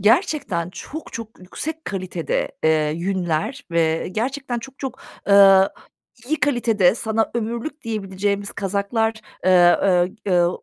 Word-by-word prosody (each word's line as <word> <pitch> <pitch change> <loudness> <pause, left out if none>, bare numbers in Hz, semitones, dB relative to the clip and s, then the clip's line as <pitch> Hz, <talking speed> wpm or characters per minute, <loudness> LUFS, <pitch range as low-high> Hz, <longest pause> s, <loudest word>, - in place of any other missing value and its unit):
Gerçekten 215 - +1
çok 310 +11 -8
çok 230 -1 -8
yüksek 315 - -6
kalitede, 185 -4 -3
eee, 155 -1 +3
yünler 190 - -2
ve 165 -1 +1
gerçekten 250 +2 -2
çok 265 +3 -11
çok, 265 -2 -5 0.3
ııı, 195 -1 +7 0.6
iyi 310 +4 -1
kalitede 230 -9 +3
sana 220 -1 -1
ömürlük 235 +6 -3
diyebileceğimiz 200 -2 -2
kazaklar, 200 +3 -1 0.3
eee, 180 -1 +6 0.5
eee, 195 - +1
eu 175 0 +2
205 Hz, 120 wpm, -22 LUFS, 185-240 Hz, 0.6 s, ııı